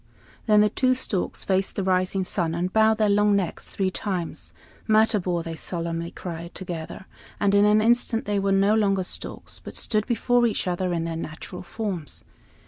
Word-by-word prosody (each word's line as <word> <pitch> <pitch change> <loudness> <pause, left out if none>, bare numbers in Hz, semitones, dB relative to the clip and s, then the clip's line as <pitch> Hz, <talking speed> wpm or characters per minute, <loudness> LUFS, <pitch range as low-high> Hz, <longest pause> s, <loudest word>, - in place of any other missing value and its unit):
Then 210 -1 +6
the 210 - +4
two 255 +2 +2
storks 205 -7 -2
faced 190 0 0
the 195 - -1
rising 185 +1 +1
sun, 170 -3 -1
and 180 +2 -2
bowed 220 0 +4
their 215 -1 +3
long 205 0 +4
necks 190 -4 -2
three 190 -1 -1
times. 185 -4 -4 0.4
"Matabor!" 210 -6 +2
they 165 0 -5
solemnly 170 0 -3
cried, 170 -1 -7
together; 175 -1 -6 0.3
and 200 -1 +2
in 200 0 +5
an 210 +1 +5
instant 235 0 +2
they 205 -1 0
were 195 0 0
no 195 +2 +4
longer 200 -3 +2
storks, - - -5
but - - -10
stood 215 -1 0
before 245 0 +2
each 220 - -1
other 180 0 -1
in 170 -1 -1
their 165 0 -3
natural 165 +3 -7
forms. 185 -4 -5
195 Hz, 180 wpm, -25 LUFS, 175-210 Hz, 0.4 s, Then